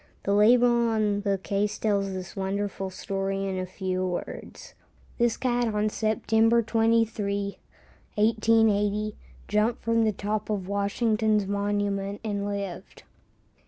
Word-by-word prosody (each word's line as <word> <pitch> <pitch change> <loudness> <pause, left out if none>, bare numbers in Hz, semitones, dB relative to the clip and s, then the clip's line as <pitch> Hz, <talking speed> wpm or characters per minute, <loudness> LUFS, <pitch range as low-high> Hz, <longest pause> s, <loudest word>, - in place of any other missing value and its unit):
The 200 - +1
label 235 +2 +5
on 210 -2 +1
the 200 -1 0
case 200 +2 -1
tells 200 -2 0
this 185 -2 -6
wonderful 195 0 -2
story 195 +1 -3
in 190 -1 -2
a 185 - -3
few 185 0 -3
words: 180 -1 -6 0.5
"This 235 -1 +2
cat 240 -3 0
on 210 +1 +1
September 220 +2 +2
23, 220 -3 0 0.6
1880, 215 -1 +2 0.3
jumped 210 +3 +1
from 230 0 +2
the 220 - +2
top 210 +2 -3
of 200 -4 -2
Washington's 210 +1 +1
monument 200 0 -1
and 205 -2 -2
lived." 200 -2 -6
205 Hz, 125 wpm, -26 LUFS, 200-220 Hz, 0.6 s, label